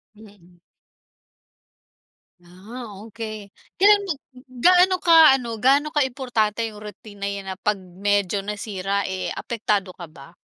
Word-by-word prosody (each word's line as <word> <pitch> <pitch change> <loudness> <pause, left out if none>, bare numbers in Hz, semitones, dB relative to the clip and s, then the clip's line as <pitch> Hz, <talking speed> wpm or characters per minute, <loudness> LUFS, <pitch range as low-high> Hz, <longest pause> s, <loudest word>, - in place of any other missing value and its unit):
Mm. 200 -5 -19 1.8
Ah, 195 +8 -11 0.2
okey. 215 -2 -8 0.3
Kailan 410 +2 +5
mo 345 - 0 0.5
gaano 365 +1 +5
ka 325 -5 +7
ano, 230 -4 -5
gaano 275 +5 +3
kaimportante 245 -6 -1
yung 210 -1 -12
routine 210 0 -12
na 200 - -1
'yan 200 -1 -6
na - - -6
pag 210 -1 0
medyo 195 +2 -1
nasira, 200 -1 -3
eh, 190 0 -4
apektado 210 -4 -2
ka 175 -3 -10
ba? 155 0 -16
210 Hz, 125 wpm, -22 LUFS, 195-255 Hz, 1.8 s, ka